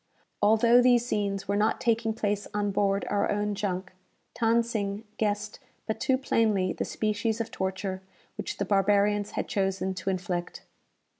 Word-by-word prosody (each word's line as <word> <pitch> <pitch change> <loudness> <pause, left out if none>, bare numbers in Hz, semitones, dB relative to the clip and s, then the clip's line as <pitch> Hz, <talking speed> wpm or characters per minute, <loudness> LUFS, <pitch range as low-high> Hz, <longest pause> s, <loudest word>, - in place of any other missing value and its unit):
Although 225 +3 +5
these 245 -1 +4
scenes 200 -4 -2
were 200 - 0
not 210 +2 +2
taking 230 -1 +1
place 205 -2 -1
on 205 -1 0
board 195 0 +1
our 205 0 +1
own 205 0 0
junk, 190 -2 -3 0.5
Than 230 0 +3
Sing 210 -2 -3 0.2
guessed 210 0 -1 0.3
but 220 - -3
too 260 0 +2
plainly 215 -7 +1
the - - -3
species 215 +1 -1
of 230 - -3
torture 190 0 -3 0.3
which - - -5
the - - -1
barbarians 205 +1 +2
had - - -1
chosen 190 -1 -1
to 190 - -4
inflict. 180 -2 -3
205 Hz, 155 wpm, -28 LUFS, 195-220 Hz, 0.5 s, Although